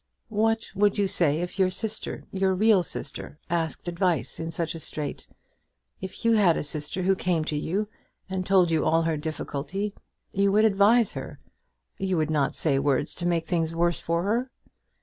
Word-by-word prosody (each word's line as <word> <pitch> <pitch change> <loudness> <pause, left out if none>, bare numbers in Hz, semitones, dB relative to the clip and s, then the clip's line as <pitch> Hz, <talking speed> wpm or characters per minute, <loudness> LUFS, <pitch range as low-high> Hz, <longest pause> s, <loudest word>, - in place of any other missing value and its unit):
"What 225 +1 +1
would 205 +1 +2
you 205 - +2
say 160 -4 +2
if 180 +2 -5
your 190 -1 +4
sister, 215 +4 -2
your 190 -1 +1
real 210 0 +4
sister, 150 -3 -6
asked 165 0 -2
advice 170 - -1
in 165 0 -3
such 165 0 -2
a 165 - -7
strait? 150 -2 -5 0.7
If 190 +4 -7
you 230 - +5
had 195 -7 +4
a - - -2
sister, 150 +4 -1
who 195 +1 +4
came 175 -4 0
to 155 - -2
you, 185 +8 -1 0.4
and 190 -1 -2
told 185 -3 +3
you 160 - +2
all 165 +1 +3
her 165 -1 0
difficulty, 155 +5 -4 0.4
you 200 0 +2
would 215 +1 +5
advise 215 +3 +4
her. - - -7 0.6
You 190 -2 0
would 155 0 0
not 145 -3 +1
say 140 -4 +2
words 140 +1 +1
to 175 - -3
make 170 -2 0
things 165 -2 -1
worse 170 0 +1
for 170 +1 -1
her." 235 +6 0
175 Hz, 185 wpm, -26 LUFS, 160-195 Hz, 0.7 s, you